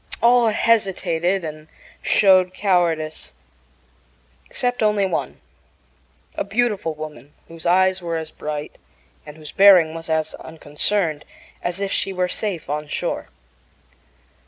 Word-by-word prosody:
All 240 0 +4
hesitated 190 -5 +1
and 155 -1 -7 0.3
showed 185 -2 +4
cowardice, 170 -6 0 1.1
except 245 -1 -2
only 210 -2 +2
one 180 - -3 0.9
a - - -2
beautiful 200 -6 -1
woman 150 -3 -9
whose 165 +1 -7
eyes 185 +1 +3
were 170 -1 -3
as 160 -1 -6
bright 150 -1 -6 0.5
and 150 +1 -10
whose 155 -2 -10
bearing 185 -5 +6
was 165 0 -8
as 160 -1 0
unconcerned 160 +1 -2 0.4
as 175 +2 -3
if 200 -1 -2
she 195 - -1
were 180 -1 0
safe 185 -3 -3
on 150 +1 -3
shore. - - -3
175 Hz, 120 wpm, -21 LUFS, 155-195 Hz, 1.1 s, bearing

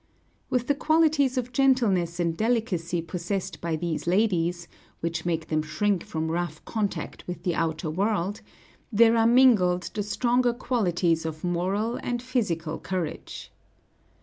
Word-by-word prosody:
With 250 -1 0
the 285 - +2
qualities 300 -3 +2
of 250 0 -2
gentleness 215 - +2
and 170 -2 0
delicacy 190 -7 0
possessed 185 +3 -4
by 170 -1 -1
these 165 0 -3
ladies, 175 -3 +1 0.3
which 165 0 -3
make 165 -1 -2
them 155 -1 +1
shrink 195 +4 0
from 160 0 -3
rough 170 -2 -3
contact 210 -4 -3
with 180 - -6
the 175 - 0
outer 160 0 -1
world, 200 +2 -1 0.5
there 225 +1 +5
are 225 0 +4
mingled 215 -8 +4
the 210 - -2
stronger 240 +4 +1
qualities 180 -9 0
of 160 -1 -5
moral 190 +6 -1
and 245 0 -2
physical 180 -11 -2
courage. 180 -4 -5
185 Hz, 140 wpm, -26 LUFS, 170-235 Hz, 0.5 s, there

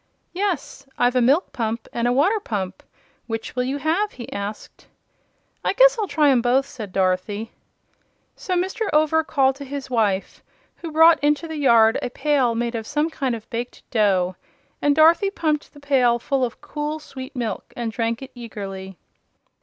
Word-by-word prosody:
"Yes; 355 -7 -3
I've 245 +1 +2
a 250 - +4
milk 280 +9 +2
pump 225 -1 -3
and 235 0 0
a - - +2
water 360 - +3
pump; 195 - -4 0.5
which 225 0 -5
will 250 0 0
you 270 +2 -2
have?" 335 +8 0
he 240 - -9
asked. 200 +1 -7 0.8
"I - - +1
guess - - +6
I'll 420 - 0
try 295 -2 +3
'em 250 -3 +3
both," 255 +3 +2
said 220 -8 -8
Dorothy. 195 +4 -1 0.8
So 365 - -3
Mr. 380 +5 -1
Over 310 +1 +3
called 270 -3 +1
to 285 - -7
his 275 -1 -6
wife, 205 -5 0 0.4
who 330 - -7
brought 320 0 +6
into 295 +3 +2
the 320 -1 -5
yard 230 -5 +5
a 250 - -3
pail 260 -3 +1
made 235 +1 -1
of 225 -1 -4
some 300 +2 0
kind 265 -6 -1
of 220 -1 -10
baked 240 +1 -6
dough, 190 -5 +2 0.5
and 290 0 +3
Dorothy 330 +6 +5
pumped 310 -6 -2
the 290 - -15
pail 260 -4 +3
full 265 +2 -1
of 240 - -3
cool, 300 +1 -4
sweet 265 -4 -10
milk 230 -5 -4
and 235 -2 -2
drank 230 +2 -2
it 265 - -10
eagerly. 195 -5 -8
260 Hz, 175 wpm, -22 LUFS, 225-300 Hz, 0.8 s, guess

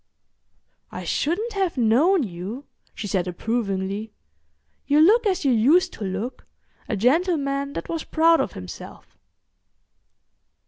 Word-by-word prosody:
"I - - -6
shouldn't 420 +10 -1
have 385 -7 -1
known 275 - +3
you," 200 +7 -6 0.3
she - - -6
said 190 -3 -1
approvingly. 200 +1 -3 0.8
"You 290 +1 +4
look 430 +8 +5
as 370 -6 -1
you 270 - +4
used 305 +11 +3
to - - -7
look—a 215 +2 -6
gentleman 280 - +1
that - - -5
was 330 -2 -3
proud 330 0 +3
of - - -3
himself." 90 -1 -10
275 Hz, 120 wpm, -23 LUFS, 210-335 Hz, 0.8 s, look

